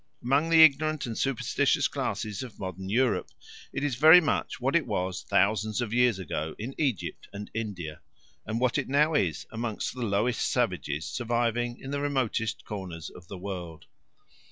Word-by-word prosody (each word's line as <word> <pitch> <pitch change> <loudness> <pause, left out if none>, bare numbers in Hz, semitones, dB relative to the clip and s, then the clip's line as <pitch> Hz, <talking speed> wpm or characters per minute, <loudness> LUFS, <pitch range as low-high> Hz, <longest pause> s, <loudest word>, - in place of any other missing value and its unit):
Among 140 +6 +2
the 165 -1 +8
ignorant 155 0 +3
and 115 -2 -4
superstitious 135 -1 +1
classes 105 -2 -3
of 125 -5 -8
modern 95 -1 -6
Europe 120 +1 +1 0.4
it 140 - -3
is 145 -2 0
very 160 +5 +9
much 155 -4 -1
what 135 +4 0
it 170 -5 +2
was 95 -3 -2
thousands 105 +2 +1
of 120 -3 -2
years 125 -3 +3
ago 80 -3 -4
in 120 +6 -5
Egypt 135 - -2
and 105 0 -8
India, 95 -9 -5 0.4
and 110 +2 -3
what 125 +2 +2
it 135 - -4
now 150 +3 +3
is 90 - 0
among 115 -1 -4
the 125 - -7
lowest 110 +2 0
savages 75 +2 -1
surviving 120 +3 -1
in 135 - -7
the 140 0 -2
remotest 130 -6 -1
corners 90 -6 -6
of 90 - -14
the 100 - -7
world. 90 -4 -7
115 Hz, 170 wpm, -28 LUFS, 100-135 Hz, 0.4 s, very